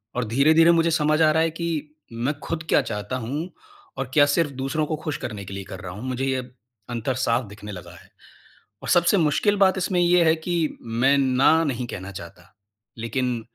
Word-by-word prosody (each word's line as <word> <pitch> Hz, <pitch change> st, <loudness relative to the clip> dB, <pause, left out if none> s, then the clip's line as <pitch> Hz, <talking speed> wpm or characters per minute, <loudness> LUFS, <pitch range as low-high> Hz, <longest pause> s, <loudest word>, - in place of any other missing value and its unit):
और 125 Hz, -1 st, -1 dB
धीरे-धीरे 155 Hz, +8 st, +5 dB
मुझे 165 Hz, 0 st, +3 dB
समझ 155 Hz, 0 st, +2 dB
आ 155 Hz, -1 st, +5 dB
रहा 160 Hz, +1 st, +2 dB
है 165 Hz, -, +1 dB
कि 155 Hz, -3 st, -3 dB, 0.2 s
मैं 120 Hz, +5 st, -1 dB
ख़ुद 165 Hz, -1 st, -3 dB
क्या -, -, +4 dB
चाहता 105 Hz, 0 st, -4 dB
हूँ 150 Hz, +9 st, -4 dB, 0.5 s
और 130 Hz, -1 st, -4 dB
क्या 145 Hz, -2 st, +6 dB
सिर्फ़ 165 Hz, -4 st, +1 dB
दूसरों 155 Hz, +3 st, -1 dB
को 155 Hz, -, -2 dB
ख़ुश 155 Hz, -2 st, -2 dB
करने 105 Hz, -4 st, -6 dB
के 95 Hz, -, -8 dB
लिए 100 Hz, 0 st, -5 dB
कर -, -, -7 dB
रहा 95 Hz, -3 st, -7 dB
हूँ, 105 Hz, +5 st, -9 dB
मुझे 130 Hz, +1 st, -2 dB
ये 130 Hz, -2 st, -2 dB, 0.4 s
अंतर 120 Hz, +2 st, -2 dB
साफ़ 120 Hz, +2 st, +1 dB
दिखने 105 Hz, +1 st, -10 dB
लगा 90 Hz, -3 st, -10 dB
है। -, -, -21 dB, 0.7 s
और -, -, -5 dB
सबसे 175 Hz, +3 st, +4 dB
मुश्किल 170 Hz, +5 st, +2 dB
बात 190 Hz, -1 st, +4 dB
इसमें 185 Hz, 0 st, 0 dB
ये 175 Hz, 0 st, +4 dB
है 160 Hz, -1 st, +4 dB
कि 165 Hz, +2 st, -4 dB, 0.3 s
मैं 120 Hz, +5 st, +2 dB
ना 140 Hz, +4 st, +3 dB
नहीं 130 Hz, -5 st, -2 dB
कहना 100 Hz, -3 st, -7 dB
चाहता। 90 Hz, -1 st, -11 dB, 0.4 s
लेकिन 120 Hz, +1 st, -2 dB
135 Hz, 205 wpm, -23 LUFS, 115-160 Hz, 0.7 s, क्या